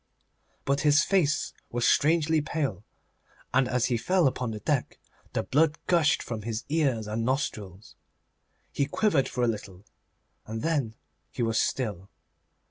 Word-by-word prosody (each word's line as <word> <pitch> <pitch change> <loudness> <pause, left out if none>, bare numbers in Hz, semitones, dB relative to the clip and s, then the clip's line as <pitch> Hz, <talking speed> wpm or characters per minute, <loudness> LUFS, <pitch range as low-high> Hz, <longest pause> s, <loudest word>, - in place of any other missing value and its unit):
But 140 +1 +1
his 145 0 +5
face 170 -7 +1 0.2
was 120 0 0
strangely 160 0 +3
pale, 140 - -3 0.7
and 130 0 +3
as 125 -1 +1
he 120 - +1
fell 180 +9 +2
upon 125 -2 0
the 110 -1 -5
deck - - -1 0.4
the - - 0
blood 150 +2 +2
gushed 165 -4 +3
from 115 -3 -5
his 110 +1 -4
ears 140 -8 +1
and 110 +2 -2
nostrils. 110 -7 -3 0.8
He 140 - 0
quivered 155 -3 +1
for 125 - -2
a - - +3
little, 100 -3 -5 0.6
and 110 +1 -5
then 140 -9 0 0.3
he - - -3
was 115 -1 +2
still. 100 -7 -2
130 Hz, 145 wpm, -27 LUFS, 110-150 Hz, 0.8 s, his